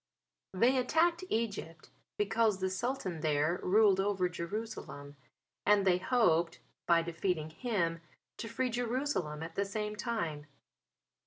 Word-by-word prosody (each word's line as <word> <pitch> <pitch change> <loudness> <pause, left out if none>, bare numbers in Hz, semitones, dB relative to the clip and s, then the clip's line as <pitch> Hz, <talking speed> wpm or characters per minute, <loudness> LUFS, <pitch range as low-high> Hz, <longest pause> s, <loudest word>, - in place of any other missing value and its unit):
They 240 +8 +3
attacked 335 +7 +2
Egypt 205 -8 -3 0.3
because 210 0 +2
the 190 0 -1
Sultan 190 -4 -2
there 155 +3 +1
ruled 200 0 +4
over 195 -2 +1
Jerusalem 170 -6 -6 0.5
and 205 -1 +4
they 180 -1 +4
hoped 175 -7 +2 0.3
by 170 -1 +4
defeating 170 -2 -2
him 170 -6 -1 0.4
to 230 - -5
free 250 +3 -1
Jerusalem 240 - -1
at 165 0 -7
the 200 - 0
same 210 +1 -3
time. 170 -11 -3
195 Hz, 125 wpm, -32 LUFS, 170-230 Hz, 0.5 s, ruled